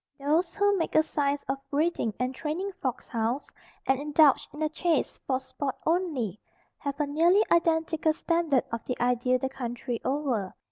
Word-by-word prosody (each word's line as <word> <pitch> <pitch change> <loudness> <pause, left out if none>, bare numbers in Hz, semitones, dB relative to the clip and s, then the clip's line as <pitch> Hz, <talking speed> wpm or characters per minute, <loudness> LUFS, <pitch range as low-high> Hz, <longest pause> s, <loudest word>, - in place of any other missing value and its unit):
Those 320 +5 +1
who 405 0 +3
make 330 - -2
a 315 - +6
science 285 -2 -1
of 270 0 -1
breeding 295 -5 +1
and 250 +1 -1
training 325 +8 -3
fox 255 -2 -3
hounds, 235 +4 -1 0.4
and 265 0 +2
indulge 295 -1 +4
in 290 - -12
the 310 - +2
chase 325 -1 0
for 260 -1 +1
sport 265 +1 -4
only, 300 - 0 0.4
have 280 0 -4
a 295 - +2
nearly 335 +8 +4
identical 320 -1 +3
standard 330 -5 +1
of 230 -1 -3
the 250 - -3
ideal 250 +1 +2
the 265 - -2
country 245 -2 -4
over. 260 -8 -1
285 Hz, 170 wpm, -28 LUFS, 255-320 Hz, 0.4 s, a